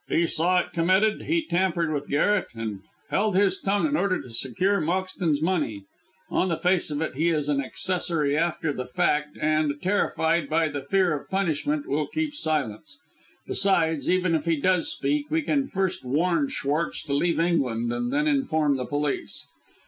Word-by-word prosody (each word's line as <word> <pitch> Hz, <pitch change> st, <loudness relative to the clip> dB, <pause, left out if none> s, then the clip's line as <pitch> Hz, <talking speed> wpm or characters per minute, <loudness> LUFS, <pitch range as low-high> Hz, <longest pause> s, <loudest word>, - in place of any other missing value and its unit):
He 170 Hz, -, +2 dB
saw 180 Hz, +3 st, +2 dB
it -, -, -10 dB
committed, 185 Hz, +6 st, +2 dB
he 330 Hz, -1 st, +1 dB
tampered 170 Hz, -, 0 dB
with 145 Hz, -1 st, -4 dB
Garret, 190 Hz, +7 st, +2 dB
and 110 Hz, -3 st, -4 dB, 0.3 s
held 205 Hz, -1 st, +1 dB
his 190 Hz, -1 st, +3 dB
tongue 200 Hz, +5 st, +1 dB
in 295 Hz, -1 st, +1 dB
order 195 Hz, -9 st, +1 dB
to 125 Hz, -, -10 dB
secure 135 Hz, -, 0 dB
Moxton's 175 Hz, -2 st, -1 dB
money. 155 Hz, -, -1 dB, 0.5 s
On 185 Hz, -, +1 dB
the 165 Hz, -, 0 dB
face 180 Hz, -2 st, +1 dB
of 150 Hz, +1 st, -2 dB
it, -, -, -3 dB
he 160 Hz, +6 st, +1 dB
is 150 Hz, -3 st, 0 dB
an 140 Hz, -2 st, +1 dB
accessory 165 Hz, -2 st, 0 dB
after 160 Hz, -1 st, 0 dB
the 125 Hz, -2 st, -5 dB
fact, 150 Hz, +4 st, 0 dB
and, 155 Hz, -1 st, +1 dB
terrified 170 Hz, -4 st, +1 dB
by 160 Hz, 0 st, +2 dB
the 145 Hz, -1 st, -4 dB
fear 180 Hz, +4 st, +2 dB
of 140 Hz, -, -8 dB
punishment, 155 Hz, -6 st, -1 dB
will 150 Hz, +2 st, 0 dB
keep 310 Hz, -1 st, -2 dB
silence. 150 Hz, -, -3 dB, 0.5 s
Besides, 165 Hz, -6 st, +1 dB
even 185 Hz, -1 st, +2 dB
if 160 Hz, -1 st, 0 dB
he 165 Hz, -1 st, +2 dB
does 185 Hz, -, +1 dB
speak, 295 Hz, -1 st, -1 dB
we 320 Hz, 0 st, +1 dB
can 280 Hz, -2 st, 0 dB
first 190 Hz, -4 st, -2 dB
warn 155 Hz, +3 st, +1 dB
Schwartz 145 Hz, +5 st, -2 dB
to 145 Hz, -, -4 dB
leave 165 Hz, +4 st, +1 dB
England, 125 Hz, -9 st, +1 dB
and 245 Hz, -, -2 dB
then 295 Hz, +2 st, +1 dB
inform 160 Hz, -, +1 dB
the 125 Hz, -, -3 dB
police. 145 Hz, -1 st, -2 dB
165 Hz, 180 wpm, -25 LUFS, 145-190 Hz, 0.5 s, his